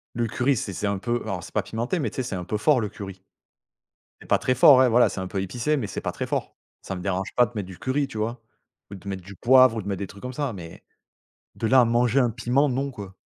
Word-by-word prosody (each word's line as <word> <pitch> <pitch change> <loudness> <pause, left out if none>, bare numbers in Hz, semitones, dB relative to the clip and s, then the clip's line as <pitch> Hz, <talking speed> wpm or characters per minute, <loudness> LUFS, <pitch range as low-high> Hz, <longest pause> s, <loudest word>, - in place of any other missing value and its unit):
Le 120 0 0
curry, 130 +4 +1
c'est 100 - -4
c'est 100 - -2
un 100 0 0
peu 120 +4 -2
alors 95 -4 -4
c'est - - -12
pas - - +1
pimenté 120 +10 -3
mais, 145 - -1
tu - - -13
sais, 130 - 0
c'est 120 -5 -4
un 90 - -4
peu 105 +4 -2
fort 130 +4 +3
le 105 - -2
curry. 95 -2 -9 1.0
C'est - - -14
pas - - +4
très 130 - 0
fort, 130 +2 +7
ouais, 130 0 +6
voilà, 120 +1 +4
c'est - - -6
un 95 - -3
peu 95 +1 -3
épicé 120 +10 -1
mais 115 -7 -3
c'est 95 - -5
pas - - -2
très - - -5
fort. - - -3 0.3
Ça - - -5
me 90 - -6
dérange 95 0 -2
pas 125 -1 +5
de 120 - -17
mettre 105 -3 -3
du 95 -2 -11
curry, 135 +2 0
tu 110 -5 -7
vois, 115 +3 -2 0.5
ou - - -6
de 100 +1 -12
mettre 95 -2 -5
du 100 +2 -11
poivre 130 +1 +5
ou - - -2
de 100 - -9
mettre 100 -1 -2
des 100 - -4
trucs 100 +2 -13
comme 125 - -5
ça 140 -2 -2
mais, 85 -4 -10 0.7
de - - -3
là 130 +3 +6
à - - +5
manger 120 +3 +2
un 125 - +3
piment, 125 +5 +1
non, 135 +2 -1
quoi! 100 -7 -10
115 Hz, 295 wpm, -25 LUFS, 100-130 Hz, 1.0 s, fort